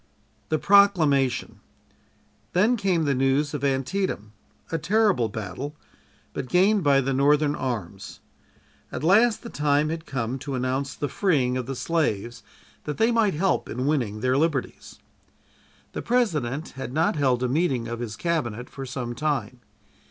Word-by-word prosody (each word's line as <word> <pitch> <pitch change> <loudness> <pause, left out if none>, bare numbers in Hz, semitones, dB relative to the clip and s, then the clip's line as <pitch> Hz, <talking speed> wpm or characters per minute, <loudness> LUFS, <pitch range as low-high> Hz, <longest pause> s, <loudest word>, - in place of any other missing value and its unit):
THE 155 - +2
PROCLAMATION 155 - +3 0.9
Then, 210 +7 +3
came 190 -7 +1
the 140 - +2
news 135 +3 +1
of 145 - -4
Antietam, 135 - -1 0.4
a 165 - -1
terrible 200 - +2
battle, 125 +8 -6 0.6
but 130 - -5
gained 195 +2 +3
by 140 -2 +4
the 135 +1 -1
Northern 145 +2 +3
arms. 105 - -5 0.7
At - - -5
last 215 +7 +4
the 235 - -7
time 150 +1 +1
had 160 0 -5
come 130 -1 -3
to 135 +1 -4
announce 130 +2 -2
the 145 - -2
freeing 135 -6 +1
of 125 -1 -3
the 135 - -4
slaves 120 -8 -1 0.4
that 150 - -4
they 225 +2 +3
might 225 -6 +2
help 190 +5 0
in 125 +3 -3
winning 120 -8 0
their 130 +2 +2
liberties. 150 -4 -2 1.0
The - - -4
President 155 - 0
had 135 -3 -7
not 160 +3 +2
held 130 -4 +1
a - - +2
meeting 130 -4 0
of 115 0 -5
his 115 -3 -5
Cabinet 125 -7 -2
for 135 -1 -7
some 125 -2 -4
time. 140 -2 -2
140 Hz, 150 wpm, -25 LUFS, 125-165 Hz, 1.0 s, by